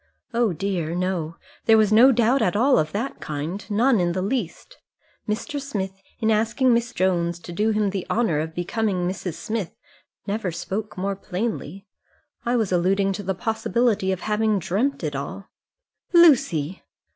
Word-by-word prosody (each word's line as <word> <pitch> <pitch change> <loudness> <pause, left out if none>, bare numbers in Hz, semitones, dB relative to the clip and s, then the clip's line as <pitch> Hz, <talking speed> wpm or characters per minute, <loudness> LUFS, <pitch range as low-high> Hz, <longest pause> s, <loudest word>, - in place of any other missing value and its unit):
"Oh 235 -3 +2
dear, 170 -2 -2
no. 175 -3 -2 0.3
There 225 -1 +6
was 215 -1 +3
no 245 +5 +8
doubt 245 +2 +3
at 180 - +1
all 255 +5 +4
of 155 0 -1
that 235 +7 -3
kind; 155 +7 -4
none 230 +2 +3
in 175 -1 +1
the 185 - -1
least. 240 - -4 0.5
Mr. 285 +7 -2
Smith 195 -8 -4 0.2
in 220 -2 +2
asking 230 +4 +2
Miss 235 +1 0
Jones 175 -3 0
to 175 - -10
do 210 +6 +1
him 210 -2 +1
the 190 -2 -4
honour 215 -10 +1
of 160 +1 -4
becoming 180 0 -1
Mrs. 180 -2 -4
Smith 205 +2 -4 0.5
never 200 -2 -2
spoke 190 +6 -5
more 195 +1 -1
plainly. 195 -2 -4 0.6
I 240 +1 0
was 220 -5 0
alluding 195 +2 +2
to 205 - -5
the 190 -1 -2
possibility 220 0 0
of 190 - -3
having 215 0 +1
dreamt 195 - -1
it 150 -2 -2
all." 185 +8 -6 0.6
"Lucy!" 195 - +4
200 Hz, 165 wpm, -23 LUFS, 180-225 Hz, 0.6 s, no